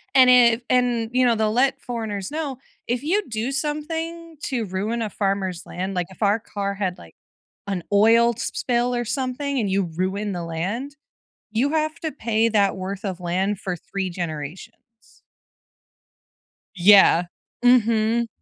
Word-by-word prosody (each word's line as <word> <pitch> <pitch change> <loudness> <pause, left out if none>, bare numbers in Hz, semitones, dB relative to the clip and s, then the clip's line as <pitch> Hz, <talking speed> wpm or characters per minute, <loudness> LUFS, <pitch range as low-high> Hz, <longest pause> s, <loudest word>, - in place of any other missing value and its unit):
and 255 -1 +7
if 240 -1 +6
and, 240 -3 +2
you 255 0 +3
know, 235 -2 +4
they'll 215 -1 +1
let 270 +3 +2
foreigners 220 -4 -4
know, 295 -5 -3 0.3
"If 245 +3 -1
you 400 +7 +1
do 225 +4 -2
something 320 +3 -4
to 240 -5 -2
ruin 205 +5 -2
a 215 - -2
farmer's 195 -3 -2
land" 190 +2 -4
like, 180 -1 -1
if 190 - -16
our 205 +3 +3
car 200 -2 -4
had, 190 -3 -2
like, 80 - -15 0.5
an 185 -4 -3
oil 230 +3 +5
sp - - -4
spill 245 0 0
or 240 0 -1
something 265 +2 -2
and 205 -3 0
you 195 0 +1
ruin 190 +4 -2
the 175 -1 -4
land, 200 - -4 0.6
you 255 +7 +1
have 310 +1 -1
to 315 -2 -2
pay 230 -3 +1
that 200 -3 +2
worth 195 +3 -5
of 185 -2 -4
land 185 +3 -1
for 180 -2 -3
3 190 +2 -4
generations. 170 +6 -8 1.5
Yeah. 180 -2 +6 0.4
Mhm. 230 -1 +3
225 Hz, 155 wpm, -23 LUFS, 195-250 Hz, 1.5 s, and